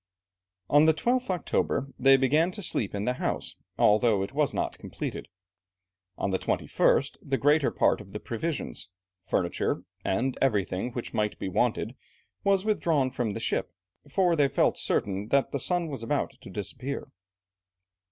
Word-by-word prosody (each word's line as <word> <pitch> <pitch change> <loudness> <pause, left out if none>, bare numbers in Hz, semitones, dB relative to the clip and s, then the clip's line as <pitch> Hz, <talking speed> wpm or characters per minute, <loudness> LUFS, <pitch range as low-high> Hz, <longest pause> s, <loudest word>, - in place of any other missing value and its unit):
On 145 +2 +6
the 160 - +5
12th 250 +5 0
October, 175 -6 0
they 135 +1 +7
began 150 +6 +3
to 205 - -6
sleep 105 - -1
in 100 +1 -2
the 125 - +1
house, - - -2 0.2
although 105 -1 +4
it 95 - -6
was - - +2
not - - -2
completed. - - -5 0.9
On 100 - -1
the 95 - 0
21st, - - +1
the 135 -1 -1
greater 145 +1 +3
part - - +2
of 95 -2 -13
the 105 - -5
provisions, 140 - -4 0.3
furniture, 85 -1 -1 0.2
and 125 +7 0
everything 105 -3 +1
which 120 - -5
might 105 -1 0
be 95 - -4
wanted 115 +3 0 0.5
was 195 0 +2
withdrawn 160 -11 +1
from 120 -5 -2
the - - -4
ship, - - -1 0.4
for 175 +3 +3
they 145 -3 +4
felt - - +2
certain 100 +1 -1
that 140 +3 +2
the 140 - -1
sun 175 +3 0
was 135 -6 -5
about 115 - -1
to - - -11
disappear. 115 +8 -5
130 Hz, 160 wpm, -28 LUFS, 105-155 Hz, 0.9 s, they